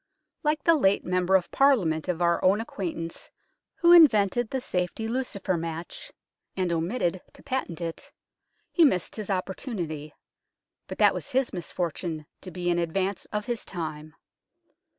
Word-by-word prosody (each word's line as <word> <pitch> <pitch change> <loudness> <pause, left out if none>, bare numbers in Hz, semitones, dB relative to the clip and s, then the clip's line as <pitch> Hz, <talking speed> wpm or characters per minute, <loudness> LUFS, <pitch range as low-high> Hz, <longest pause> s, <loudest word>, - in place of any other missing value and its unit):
Like 300 -2 0
the 335 - +6
late 200 -11 +2
Member 180 +1 +2
of 180 -2 +1
Parliament 195 - +3
of 175 -1 0
our 170 0 +2
own 195 +3 +4
acquaintance 170 -7 -5 0.5
who 340 0 +4
invented 240 - +6
the 265 - -1
safety 185 -1 -2
lucifer 225 -6 -2
match, 165 +1 -6 0.5
and 180 -2 0
omitted 175 +1 -1
to - - -17
patent 255 -11 -3
it, 165 -1 -5 0.6
he 345 - +4
missed 185 - +2
his 215 -2 -6
opportunity, 185 - -4 0.7
but - - -7
that - - +5
was - - -6
his 260 0 0
misfortune, 170 -3 -4 0.2
to 185 - -8
be 175 0 -2
in 175 - +1
advance 185 +4 -1
of 210 0 -4
his 240 -2 -3
time. 155 -3 -6
185 Hz, 150 wpm, -27 LUFS, 170-230 Hz, 0.7 s, the